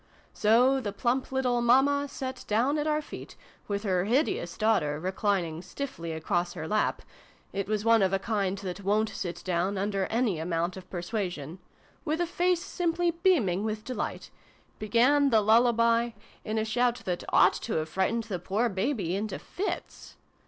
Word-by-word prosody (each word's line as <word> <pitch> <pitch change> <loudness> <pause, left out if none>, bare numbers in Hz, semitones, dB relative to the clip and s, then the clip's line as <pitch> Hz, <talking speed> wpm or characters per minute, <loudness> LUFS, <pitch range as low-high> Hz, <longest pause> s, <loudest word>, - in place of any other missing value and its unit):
So 245 +5 +4
the 205 -4 -3
plump 245 +6 -1
little 250 -2 +1
Mamma 275 +4 +4
sat 260 -2 -6
down 250 +8 +2
at 295 - -1
our 305 0 +1
feet, - - -9 0.3
with 200 0 -2
her 185 -3 +1
hideous 230 - 0
daughter 180 -10 +1
reclining 185 -2 -1
stiffly 185 -8 -6
across 175 +2 -1
her 160 - -6
lap 215 +3 0 0.5
(it 200 -1 -2
was 210 0 -1
one 230 -1 +5
of 190 -1 +3
a 195 - +2
kind 200 -1 -1
that 195 0 -6
wo'n't 215 +3 +2
sit 175 -1 -5
down, 185 +2 0
under 195 -1 -1
any 225 -7 0
amount 170 +2 -1
of 190 - -11
persuasion), 175 -5 -3
and, 175 +4 -10 0.4
with 315 0 -1
a 350 - +2
face 355 0 +1
simply 345 0 0
beaming 315 - +2
with 215 0 -3
delight, 255 - -4 0.5
began 255 +7 +3
the 225 -4 +5
lullaby, 230 +1 +3 0.3
in 215 +1 -3
a 220 - +1
shout 240 +2 0
that 180 -1 -2
ought - - +5
to - - -4
have 155 0 -1
frightened 200 +7 0
the 200 -5 -4
poor 210 +7 0
baby 195 - -1
into 205 0 -3
fits. 395 - -6
215 Hz, 170 wpm, -28 LUFS, 185-250 Hz, 0.5 s, one